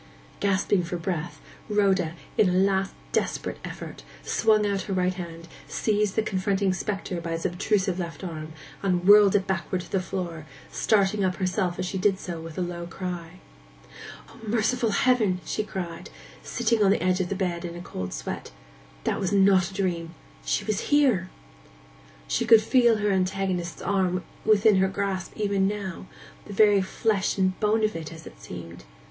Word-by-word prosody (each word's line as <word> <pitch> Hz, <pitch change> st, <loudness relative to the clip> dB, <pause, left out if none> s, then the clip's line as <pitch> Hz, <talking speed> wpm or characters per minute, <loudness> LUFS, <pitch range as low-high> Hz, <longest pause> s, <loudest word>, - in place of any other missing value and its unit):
Gasping 200 Hz, -1 st, +2 dB
for 170 Hz, +1 st, -3 dB
breath, 175 Hz, -1 st, -4 dB, 0.3 s
Rhoda, 190 Hz, -5 st, +2 dB, 0.2 s
in 210 Hz, -4 st, +4 dB
a -, -, 0 dB
last 195 Hz, +1 st, +2 dB, 0.2 s
desperate -, -, -1 dB
effort, -, -, -8 dB, 0.2 s
swung 215 Hz, -2 st, +3 dB
out 200 Hz, -1 st, 0 dB
her -, -, 0 dB
right 185 Hz, 0 st, +1 dB
hand, 170 Hz, -2 st, -8 dB, 0.2 s
seized 210 Hz, -2 st, 0 dB
the 220 Hz, -, +2 dB
confronting 195 Hz, -1 st, 0 dB
spectre 195 Hz, -2 st, -3 dB
by 165 Hz, 0 st, -3 dB
its 165 Hz, -, -4 dB
obtrusive 190 Hz, +1 st, 0 dB
left 170 Hz, +1 st, -5 dB
arm, 160 Hz, -3 st, -6 dB, 0.3 s
and 180 Hz, -2 st, 0 dB
whirled 205 Hz, -1 st, +8 dB
it 195 Hz, -2 st, +2 dB
backward 185 Hz, -1 st, -2 dB
to -, -, -13 dB
the 195 Hz, -, +2 dB
floor, 170 Hz, -4 st, -5 dB, 0.2 s
starting 200 Hz, -1 st, +2 dB
up 185 Hz, -1 st, +1 dB
herself 185 Hz, -1 st, -1 dB
as 185 Hz, -, -2 dB
she 190 Hz, +1 st, -3 dB
did 195 Hz, 0 st, +3 dB
so 175 Hz, -3 st, -6 dB
with 165 Hz, -1 st, -9 dB
a -, -, -1 dB
low 175 Hz, -1 st, -4 dB
cry. 180 Hz, -1 st, -6 dB, 0.9 s
'O, -, -, -16 dB
merciful 225 Hz, +2 st, +1 dB
heaven!' 210 Hz, -3 st, +2 dB
she -, -, -1 dB
cried, 175 Hz, -5 st, -6 dB, 0.3 s
sitting 230 Hz, -, +1 dB
on 195 Hz, -, +5 dB
the 195 Hz, -, +2 dB
edge 185 Hz, 0 st, +2 dB
of 175 Hz, -, -2 dB
the 200 Hz, -, -1 dB
bed 180 Hz, -3 st, -2 dB
in 170 Hz, -1 st, -5 dB
a -, -, -7 dB
cold 90 Hz, -, -5 dB
sweat; -, -, -5 dB, 0.5 s
'that -, -, 0 dB
was 185 Hz, -, -1 dB
not 195 Hz, -2 st, +4 dB
a -, -, -13 dB
dream—she 170 Hz, -3 st, -3 dB
was 215 Hz, -2 st, 0 dB
here!' 255 Hz, -11 st, +3 dB, 1.0 s
She -, -, 0 dB
could 225 Hz, -1 st, +7 dB
feel 240 Hz, -1 st, +4 dB
her 210 Hz, -1 st, +1 dB
antagonist's 185 Hz, -2 st, -1 dB
arm 185 Hz, -2 st, +1 dB, 0.2 s
within 215 Hz, -1 st, +5 dB
her 190 Hz, 0 st, +4 dB
grasp 190 Hz, -1 st, -3 dB
even 200 Hz, -2 st, +1 dB
now—the 200 Hz, 0 st, -7 dB
very 205 Hz, -1 st, +5 dB
flesh 195 Hz, +1 st, 0 dB
and 185 Hz, -1 st, +1 dB
bone 215 Hz, +1 st, +2 dB
of 215 Hz, -3 st, +1 dB
it, 160 Hz, -1 st, -6 dB
as 160 Hz, -1 st, -11 dB
it -, -, -13 dB
seemed. 85 Hz, -4 st, -9 dB
190 Hz, 175 wpm, -26 LUFS, 175-205 Hz, 1.0 s, whirled